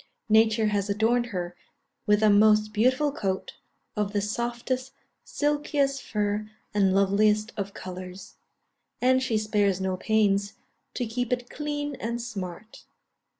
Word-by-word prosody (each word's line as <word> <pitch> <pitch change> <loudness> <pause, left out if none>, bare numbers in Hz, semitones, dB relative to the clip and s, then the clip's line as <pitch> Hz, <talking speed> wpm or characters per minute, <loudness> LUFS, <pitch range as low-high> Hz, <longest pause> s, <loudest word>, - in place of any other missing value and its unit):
Nature 220 0 +4
has 205 -1 -1
adorned 230 +4 +2
her 175 -5 -4 0.5
with 210 +1 +4
a 215 - +6
most 215 +1 +4
beautiful 255 +7 +2
coat, 190 -8 -3 0.4
of 210 -1 -1
the 205 - +2
softest, 240 +5 -3 0.3
silkiest 290 -2 0
fur 210 0 -2 0.2
and 195 -2 +3
loveliest 210 +3 +3
of 200 -1 -4
colours; 185 +1 -8 0.6
and 260 +1 +3
she 245 -4 0
spares 205 -3 +1
no 190 -1 -1
pains 200 0 +1 0.4
to 245 - -1
keep 245 +2 -3
it 245 0 -2
clean 290 -1 -3
and 235 +1 -3
smart. 215 -3 -7
215 Hz, 130 wpm, -26 LUFS, 200-245 Hz, 0.6 s, a